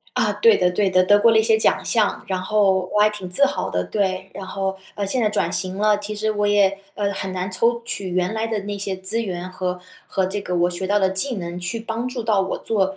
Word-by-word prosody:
啊， - - +2
对 460 0 +5
的 180 - +2
对 195 +1 +1
的， 185 0 +4
得 205 +2 +5
过 230 - +6
了 225 - +4
一 - - +5
些 220 0 +4
奖 220 - +1
项， 215 -3 +1
然 185 -1 -2
后 190 -2 +2
我 210 - +2
还 210 - +6
挺 205 -4 -7
自 280 +10 +5
豪 - - -3
的， 90 0 -1
对。 190 -2 -2
然 195 - -6
后， 190 0 -3 0.2
呃， 200 -1 -2
现 245 +5 0
在 215 - +3
转 - - 0
型 185 +1 -2
了， 210 0 +3
其 205 +1 -5
实 215 +1 0
我 205 -1 0
也， 200 -1 +3 0.2
呃， 200 -1 -1
很 190 -1 -5
难 185 +1 -3
抽 230 +5 +1
取 200 -5 -4
原 180 +3 -1
来 220 +1 -1
的 225 -1 -2
那 205 +1 -5
些 195 -1 -3
资 190 +5 -1
源， 180 -4 -5
和 180 -1 -3 0.3
和 190 -2 0
这 200 +2 -3
个 180 - -4
我 175 +1 +3
学 180 +2 -4
到 205 +2 +2
的 190 -2 +2
技 220 +7 -2
能， 175 -2 -5
去 180 +6 -3
帮 230 +2 -4
助 250 -2 -4
到 215 -3 +2
我 190 - -2
做， 220 -3 0
200 Hz, 280 characters per minute, -22 LUFS, 185-215 Hz, 0.3 s, 过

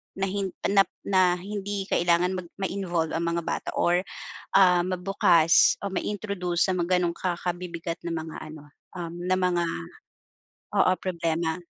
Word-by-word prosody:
na 195 - -3
hin 200 -1 -1 0.2
na 195 -2 +4 0.2
na 185 -2 +3
hindi 200 +1 -4
kailangan 175 +1 +3
mag 175 - -9
ma-involve 185 -4 -2
ang 165 +1 -1
mga 170 - 0
bata - - -3
or, 175 +1 +3 0.6
ah, 180 -2 +6
mabukas 180 -2 +4
o 200 - -3
ma-introduce 190 -3 -1
sa - - +2
mga 180 0 +1
gano'ng 170 -1 0
ka 180 -2 -1
kabibigat 175 -1 -4
na 170 - -2
mga 160 0 -5
ano, 155 -1 -10 0.3
um, 170 -1 -5
na 185 +1 +1
mga 180 -2 +1 1.1
oo, 185 - +4
problema. 165 -2 -1
180 Hz, 150 wpm, -26 LUFS, 170-190 Hz, 1.1 s, ah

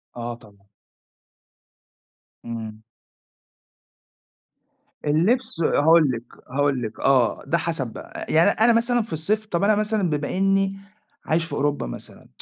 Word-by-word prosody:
آه، 120 0 -5
طبعًا. 100 -3 -21 1.8
إمم. 110 -2 -6 2.2
اللبس، 180 - +1
هاقول 160 -2 +4
لِك 115 -1 -5 0.3
هاقول 140 -2 +1
لِك 110 -1 -6
آه، 130 -5 +2
ده 170 - +2
حسب 145 -10 -3
بقى. - - -8
أ - - -2
يعني 165 +5 +5
أنا 225 +3 +3
مثلًا 235 +1 +2
في 210 -6 -7
الصيف 210 +8 -1
طب، 180 -2 -2
أنا 210 +1 +4
مثلًا 210 -4 0
بما 150 +4 -2
إني 195 0 +1 0.5
عايش 165 +1 +1
في - - -8
أوروبا 145 - -1
مثلًا، - - -10
160 Hz, 130 wpm, -23 LUFS, 125-195 Hz, 2.2 s, يعني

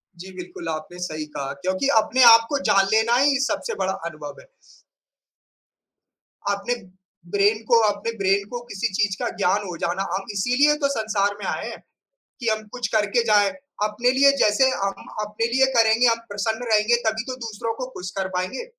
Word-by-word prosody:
जी, 185 +2 -10
बिल्कुल, 180 -2 -8
आपने 160 +3 -6
सही 155 -4 -4
कहा, 135 -1 -4
क्योंकि 185 +8 -1
अपने 255 +4 +3
आप 230 0 +5
को 285 - 0
जान 195 -1 +4
लेना 220 +2 +3
ही 275 0 +3
सबसे 375 - -2
बड़ा - - 0
अनुभव - - -8
है। - - -21 2.0
आपने 200 +5 -1 0.6
ब्रेन 205 +2 +2
को 235 -2 +6
अपने 205 +2 -2
ब्रेन 195 0 +1
को 245 - -5
किसी 220 -1 -3
चीज़ 200 -1 +1
का 240 - -1
ज्ञान 200 +1 +1
हो 175 -2 -6
जाना, 175 +4 -2
हम 195 0 -4
इसीलिए 250 +9 +3
तो - - +5
संसार 215 -5 -1
में 200 - -6
आए - - -3
हैं, - - -9 0.6
कि 235 - -2
हम 220 0 0
कुछ 245 -2 -3
करके 215 +2 +2
जाएँ। 205 -3 +4 0.3
अपने 215 +4 +1
लिए 275 +2 +5
जैसे 215 +6 +4
हम 195 -6 -3 0.2
अपने 210 +2 -2
लिए 265 +1 +4
करेंगे, 225 +2 +4
हम 230 0 +3
प्रसन्न 220 +4 -3
रहेंगे, 215 +3 +4
तभी 220 0 0
तो 255 - -4
दूसरों 225 +1 -4
को 255 +2 -5
खुश 180 -5 -7
कर 190 -1 -1
पाएँगे। 185 - -3
215 Hz, 180 wpm, -23 LUFS, 195-240 Hz, 2.0 s, को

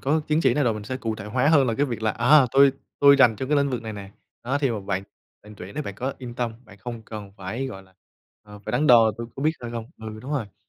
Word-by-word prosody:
có 150 +4 +1
chứng 155 +1 +2
chỉ - - +3
này 145 -2 +1
rồi 115 - +1
mình 105 -1 -7
sẽ 130 +4 -4
cụ 115 -4 -3
thể 105 - -8
hóa 125 +7 +1
hơn 145 -4 +5
là 115 - 0
cái 145 +5 +1
việc 120 -4 -5
là, 110 - +2
à, 130 +5 +5
"Tôi 140 0 +6 0.3
tôi 140 0 +7
rành 120 -5 +5
trong 130 +4 -5
cái 150 - +4
lĩnh 140 -1 +1
vực 125 -3 -3
này 110 -1 -6
nè, 100 -2 -9 0.3
đó, 135 +4 0
thì 135 -3 +1
mà 110 -3 -3
bạn 95 -1 -3 0.4
bạn 105 +1 -13
tuyển 95 +1 -10
bạn 100 - -6
có 130 +2 -3
yên 125 -2 -8
tâm, 120 -2 -2
bạn 105 -3 -16
không 115 +3 -7
cần 105 -3 -9
phải, 110 +8 -4
gọi 95 -7 -8
là, 95 0 -24 0.5
ờ, 105 -1 -13
phải - - -6
đắn 135 +5 +1
đo 115 -4 +6
tôi 115 - -5
có 135 - -5
biết 155 - +3
hay 120 -1 -6
không." 115 -1 -5
Ừ, 110 -1 -8
đúng 135 +6 -6
rồi. 115 -9 -3
120 Hz, 300 wpm, -24 LUFS, 105-135 Hz, 0.5 s, tôi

